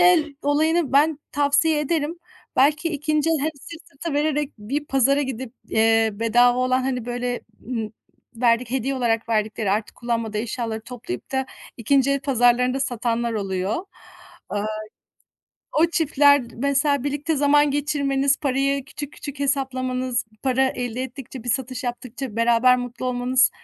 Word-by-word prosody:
el 330 -5 +4
olayını 305 +1 +2
ben 295 +2 +4
tavsiye 290 +2 +2
ederim. 310 +2 -1 0.4
Belki 300 +5 +3
2'nci 305 0 0
el 325 - +2
hem 305 +3 0
sırt 315 +4 -11
sırta 305 +3 -6
vererek 295 -1 0
bir 275 +8 -3
pazara 275 +2 +3
gidip, 260 -2 -5 0.2
eee, 225 0 +3
bedava 240 +3 +3
olan, 255 0 +2
hani, 255 -3 -2
böyle, 245 0 -2 0.3
ımm, 225 -3 -3 0.4
verdik 235 0 +2
hediye 265 +1 -1
olarak 230 -2 0
verdikleri, 215 -2 0
artık 210 +2 -1
kullanmadığı 230 -3 -2
eşyaları 225 0 -3
toplayıp 230 - -7
da 265 0 0 0.3
2'nci 270 +4 +2
el 275 -1 +1
pazarlarında 250 -1 +2
satanlar 235 -2 -1
oluyor. 195 - -2 0.6
Aaa, 205 0 -2 1.1
o 330 - +6
çiftler, 285 -4 +4
mesela, 280 +1 +1
birlikte 290 +2 -1
zaman 290 +1 +4
geçirmeniz, 280 -1 +1
parayı 275 -1 0
küçük 290 0 -8
küçük 285 -1 -8
hesaplamanız, 255 -3 -1 0.2
para 265 0 +2
elde 245 -1 -3
ettikçe, 260 -1 -8
bir 245 - -1
satış 255 +1 -2
yaptıkça 245 -1 -5
beraber 235 +2 +4
mutlu 245 +1 -5
olmanız 250 +1 +2
260 Hz, 140 wpm, -23 LUFS, 240-285 Hz, 1.1 s, o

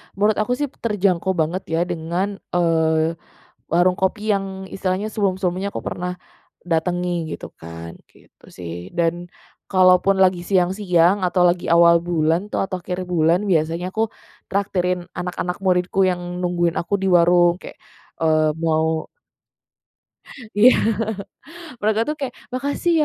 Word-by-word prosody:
menurut 210 +2 +2
aku 215 +4 +1
sih 290 0 -3
terjangkau 190 -4 0
banget 170 +3 -1
ya 165 +1 0
dengan, 175 +3 -3 0.2
eee, 160 -1 +2 0.6
warung 180 +2 +3
kopi 205 +3 -1
yang 190 -1 -3
istilahnya 190 +2 -2
sebelum-sebelumnya 195 -2 -1
aku - - -4
pernah 180 0 -3 0.5
datangi 175 0 -1
gitu - - -7
kan, 85 0 -9 0.2
gitu - - -23
sih. 85 0 -8
Dan 170 +1 0 0.4
kalau 185 -1 +6
pun 195 0 +3
lagi 185 -2 +3
siang-siang, 185 0 +2
atau 180 0 +2
lagi 175 0 0
awal 170 0 +6
bulan 170 +2 0
tuh, - - -1
atau 185 -1 -5
akhir 180 +1 -4
bulan 170 +3 +2
biasanya 170 +2 0
aku 225 0 +1 0.4
traktirin 180 -2 -1
anak-anak 180 0 -3
muridku 180 0 +1
yang 180 -1 -2 0.2
nungguin 175 -1 0
aku 200 - -1
di 195 - -1
warung, 175 0 +5
kayak, - - -10 0.4
eee, 155 -1 +3
mau 160 -1 0 1.5
Iya, 245 +5 +8 1.1
mereka 215 +1 +1
tuh 300 +5 -3
kayak, 270 -3 -4 0.2
"Makasih 280 +7 -1
180 Hz, 135 wpm, -21 LUFS, 170-195 Hz, 1.5 s, Iya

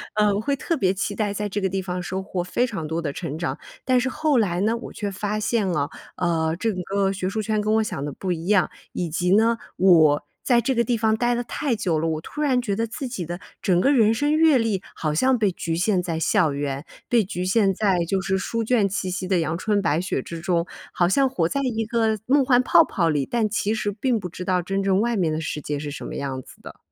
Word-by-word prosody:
呃， 210 -1 +3
会 280 +6 0
特 325 +4 -2
别 190 -8 +2
期 195 +1 -2
待 205 -1 -1
在 210 +1 -2
这 205 - -2
个 195 - +1
地 190 +1 -2
方 180 -1 -4
收 190 +2 -4
获 190 -2 -3
非 210 +7 0
常 195 -10 -5
多 160 +2 -2
的 150 -4 -2
成 155 0 -5
长。 160 -5 -3 0.2
但 255 -1 +3
是 250 - -1
后 305 0 +1
来 180 -5 0
呢， 225 +3 +1
我 230 - -9
却 205 -2 -3
发 205 +2 -3
现 215 -2 0
啊， 145 -4 0 0.3
呃， 165 -2 0
这 225 +4 0
个 195 +2 -1
学 190 -1 -3
术 215 +3 -2
圈 215 0 0
跟 210 +1 +1
我 220 - +3
想 185 - -4
的 145 -1 -4
不 185 +6 -3
一 170 0 -3
样。 200 -3 +3 0.2
以 175 - -2
及 180 +4 +2
呢， 225 +2 +3 0.2
我 160 -6 +5 0.2
在 240 -2 +3
这 265 +4 0
个 235 -1 +2
地 240 - +1
方 220 0 +2
待 240 +1 +1
得 240 - -2
太 265 +1 -2
久 180 -7 0
了， 165 - 0
我 155 -1 -2
突 300 - -7
然 260 -4 +2
觉 220 -5 -2
得 225 +3 -1
自 260 +4 -5
己 195 -8 -4
的 175 +3 -6 0.2
整 180 -2 +2
个 275 - +4
人 225 -5 +4
生 290 +6 +1
阅 315 -3 +5
历 225 -5 0
好 155 -2 -2
像 260 +11 +3
被 210 -4 +2
局 165 -2 -3
限 185 +2 +1
在 170 -2 -3
校 165 -2 +2
园， 140 0 -3 0.2
被 240 -1 +4
局 180 -2 -4
限 195 0 +3
在 195 -2 +1
就 190 +2 0
是 190 0 0
书 230 +4 -2
卷 225 -3 +2
气 190 -1 -3
息 185 0 -3
的 185 -2 +2
阳 165 0 -1
春 205 +2 0
白 160 -4 +1
雪 175 -6 -2
之 170 - -7
中， 170 0 0 0.3
好 175 -1 +2
像 270 +7 +3
活 170 -10 0
在 280 - -1
一 225 -3 -1
个 220 -1 +1
梦 275 +1 +4
幻 250 -1 +4
泡 - - +6
泡 170 -4 0
里， 145 -3 0
但 230 -3 +1
其 210 0 0
实 215 -2 -1
并 230 +4 0
不 180 - -5
知 180 +2 -7
道 185 -1 +1
真 195 +3 -2
正 195 0 +2
外 235 0 0
面 165 -5 +1
的 155 - -2
世 150 - -3
界 145 0 -3
是 145 0 -5
什 140 - -7
么 - - -6
样 135 -2 -3
子 - - -17
的。 - - -11
195 Hz, 280 characters per minute, -23 LUFS, 175-225 Hz, 0.3 s, 泡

